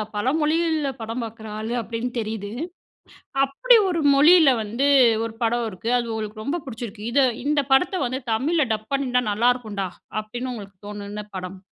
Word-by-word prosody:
பலமொழிகள்ல 305 +5 +1
படம் 230 +2 -4
பாக்குற 220 -1 -9
ஆளு 220 +2 -3
அப்பிடின்னு 230 +3 -4
தெரியுது. 215 -2 -4 0.9
அப்பிடி 470 - +4
ஒரு 340 -2 0
மொழியில 310 +1 +7
வந்து, 235 +7 0 0.4
ஒரு 225 -1 -7
படம் 235 0 +1
இருக்கு. 215 +5 -4
அது 235 -1 -4
உங்களுக்கு 215 0 -5
ரொம்ப 330 +7 -2
புடிச்சிருக்கு. 225 -4 -7
"இத, 280 - +3 0.3
இந்த 295 0 +2
படத்த 360 +7 +3
வந்து 260 +2 -3
தமிழ்ல 300 +6 +1
டப் 215 0 -6
பண்ணிருந்தா 250 -2 +1
நல்லாருக்குன்டா!' 215 -4 0 0.3
அப்பிடின்னு 240 +4 -5
உங்களுக்கு 200 -4 -10
தோணுன 205 0 -6
படம்! 185 +1 -7
235 Hz, 150 wpm, -23 LUFS, 215-275 Hz, 0.9 s, மொழியில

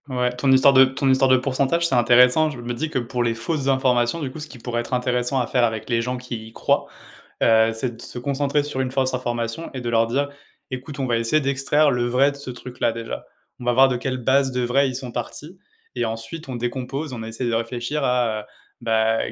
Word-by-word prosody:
Ouais, 125 -1 -1
ton 135 +2 +1
histoire 130 +1 +6
de 130 0 +8
ton 135 +1 -2
histoire 130 0 +3
de 130 - +6
pourcentage, 140 +5 0
c'est 170 - +1
intéressant, 125 +5 +5
je 135 -5 -8
me 120 0 -4
dis 155 +7 -3
que 155 - -3
pour 125 0 -2
les 115 -1 0
fausses 135 +5 -2
informations, 130 +1 +2
du 140 -5 -4
coup, 155 - -9
ce 150 - -6
qui 135 - -12
pourrait 120 0 -3
être 125 - -3
intéressant 125 +1 0
à 125 - +1
faire 125 0 +1
avec 110 -1 -1
les 115 0 +2
gens 125 +2 -3
qui 120 -3 -7
y 115 - -15
croient, - - +1 0.6
heu, 110 0 +5
c'est 120 0 -3
de - - -13
se - - -9
concentrer 140 +2 0
sur 145 -2 -5
une 130 - -1
fausse 130 -1 0
information 120 +3 -3
et 130 - -4
de 120 - -5
leur 115 -1 +3
dire: 140 +4 0 0.4
«Écoute, 130 +3 -6
on 135 - 0
va 120 -1 +1
essayer 115 +7 +2
d'extraire 140 +2 +2
le 120 -1 0
vrai 130 +4 +3
de 140 - -11
ce 140 -2 -8
truc-là, 125 -1 -3
déjà. 115 0 -6 0.3
On - - -9
va 120 - +2
voir 135 +2 +6
de 125 - 0
quelle 130 +1 -3
base 130 +2 +2
de 125 0 -1
vrai, 135 +3 +2
ils 130 - -5
sont 125 -1 -6
partis 150 - -7 0.4
et - - -1
ensuite 115 +7 -6
on 130 - -4
décompose, 130 +4 -4
on 120 - -6
essaye 115 +2 -3
de - - -1
réfléchir 120 +5 -2
à, 125 -4 +1
heu, - - -15 0.4
bah, 110 0 +2
125 Hz, 245 wpm, -22 LUFS, 120-135 Hz, 0.6 s, de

